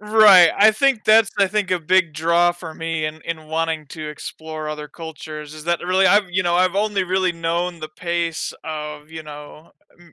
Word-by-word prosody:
Right, 210 Hz, -5 st, +7 dB
I 215 Hz, +2 st, +6 dB
think 260 Hz, 0 st, +1 dB
that's 220 Hz, -1 st, +5 dB
I 200 Hz, -, +4 dB
think 200 Hz, -1 st, -2 dB
a 180 Hz, -, +1 dB
big 175 Hz, 0 st, +2 dB
draw 170 Hz, +3 st, +2 dB
for 175 Hz, -2 st, -10 dB
me 165 Hz, -1 st, -3 dB
in 155 Hz, 0 st, -7 dB
in 160 Hz, -2 st, -6 dB
wanting 160 Hz, -1 st, -2 dB
to 155 Hz, 0 st, -7 dB
explore 155 Hz, +1 st, -7 dB
other 150 Hz, 0 st, -6 dB
cultures 155 Hz, -1 st, -9 dB
is 155 Hz, 0 st, -11 dB
that 170 Hz, 0 st, 0 dB
really 185 Hz, +2 st, +1 dB
I've 205 Hz, -2 st, +4 dB
you 185 Hz, +1 st, 0 dB
know, 175 Hz, 0 st, +1 dB
I've 185 Hz, 0 st, +2 dB
only 200 Hz, -1 st, 0 dB
really 185 Hz, 0 st, 0 dB
known 170 Hz, +1 st, -2 dB
the 155 Hz, -, -6 dB
pace 170 Hz, 0 st, -3 dB
of, 150 Hz, -1 st, -7 dB
you 160 Hz, 0 st, -8 dB
know, 150 Hz, +1 st, -12 dB, 0.3 s
M 175 Hz, -1 st, -20 dB
170 Hz, 200 wpm, -20 LUFS, 155-185 Hz, 0.3 s, Right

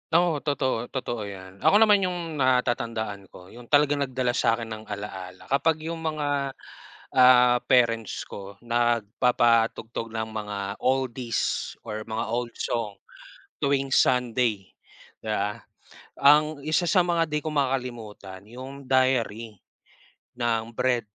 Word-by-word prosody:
Oo, 170 Hz, -3 st, +3 dB
totoo, 130 Hz, -5 st, -1 dB
totoo 120 Hz, -5 st, -4 dB
'yan. 95 Hz, -1 st, -10 dB
Ako 210 Hz, -, +5 dB
naman 210 Hz, -2 st, +5 dB
yung 175 Hz, -5 st, -3 dB
natatandaan 115 Hz, -6 st, 0 dB
ko 90 Hz, +1 st, -15 dB
'yung 120 Hz, 0 st, -13 dB
talagang 145 Hz, +1 st, +3 dB
nagdala 130 Hz, -1 st, -1 dB
sa 120 Hz, -2 st, +2 dB
akin 115 Hz, -1 st, -7 dB
ng 110 Hz, 0 st, -6 dB
alaala 95 Hz, -3 st, -7 dB
kapag 155 Hz, +3 st, +2 dB
'yung 165 Hz, +1 st, -4 dB
mga, 145 Hz, -4 st, -2 dB, 0.6 s
ah, 125 Hz, -1 st, +7 dB
parents 115 Hz, -4 st, +2 dB
ko 100 Hz, 0 st, -10 dB
nagpapatugtog 115 Hz, 0 st, +1 dB
ng 110 Hz, 0 st, -3 dB
mga 105 Hz, -2 st, -5 dB
oldies 130 Hz, -2 st, -1 dB
or 110 Hz, -1 st, -4 dB
mga 110 Hz, +1 st, -3 dB
old 120 Hz, +1 st, -2 dB
song 105 Hz, -4 st, -3 dB, 0.6 s
tuwing 135 Hz, -1 st, 0 dB
Sunday, 120 Hz, -6 st, +1 dB, 0.5 s
'di 110 Hz, -, -9 dB
ba? 105 Hz, -1 st, -1 dB, 0.6 s
Ang 150 Hz, +1 st, +5 dB
isa 155 Hz, +4 st, +1 dB
sa 180 Hz, +2 st, +4 dB
mga 170 Hz, -1 st, +1 dB
'di 150 Hz, -1 st, -2 dB
ko 155 Hz, -, -3 dB
makakalimutan 120 Hz, -9 st, -3 dB
'yong 130 Hz, +5 st, -10 dB
Diary 120 Hz, -5 st, +1 dB, 0.8 s
ng 115 Hz, -1 st, 0 dB
Bread. 125 Hz, 0 st, 0 dB
120 Hz, 130 wpm, -26 LUFS, 110-140 Hz, 0.8 s, ah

